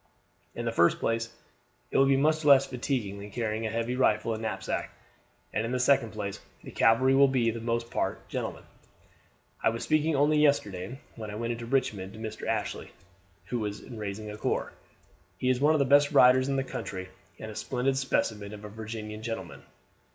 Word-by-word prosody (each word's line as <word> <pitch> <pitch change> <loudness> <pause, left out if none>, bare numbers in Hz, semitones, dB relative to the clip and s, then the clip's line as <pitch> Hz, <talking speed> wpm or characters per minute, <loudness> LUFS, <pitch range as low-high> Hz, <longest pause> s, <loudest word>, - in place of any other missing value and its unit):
"In 120 - -4
the 115 - 0
first 85 -6 +4
place 115 0 -1 0.6
it - - +1
will 135 - +6
be 135 0 +4
much 155 +3 +2
less 140 -2 +7
fatiguing 125 -6 -3
than 100 +1 -8
carrying 110 0 -2
a - - -2
heavy 115 +2 -2
rifle 115 -3 +2
and 110 - -5
knapsack; 110 -1 -3 0.6
and 110 - 0
in 115 - -3
the 130 - 0
second 125 -3 +3
place, 100 -2 -5 0.2
the - - -9
cavalry 130 +4 +4
will 140 +1 +6
for - - -4 0.2
the 115 - -5
most 115 0 -2
part - - -2
be - - -23
gentlemen. - - -4 1.0
I - - +4
was 115 +1 -4
speaking 155 0 +2
only 150 +2 +3
yesterday 125 -6 +1 0.2
when 110 -2 -7
I 105 - -6
went 115 +2 -2
into 115 0 -7
Richmond 110 -7 -1
to 110 - -11
Mr. 110 0 -6
Ashley, 110 -2 -2 0.6
who 120 -3 -2
is 105 0 -4
raising 105 -2 -6
a 105 - -8
corps. - - -2 0.6
He 130 - 0
is 130 0 -1
one 155 +2 +5
of - - +2
the 140 - +3
best 145 +2 +5
riders 130 +1 +6
in 135 - +1
the 135 - +1
country, 95 -7 -6 0.3
and 110 - -7
a - - -10
splendid 130 +3 -1
specimen 110 -6 -1
of 105 0 -11
a - - -7
Virginian 110 0 -7
gentleman. 115 0 -5
115 Hz, 200 wpm, -28 LUFS, 110-135 Hz, 1.0 s, less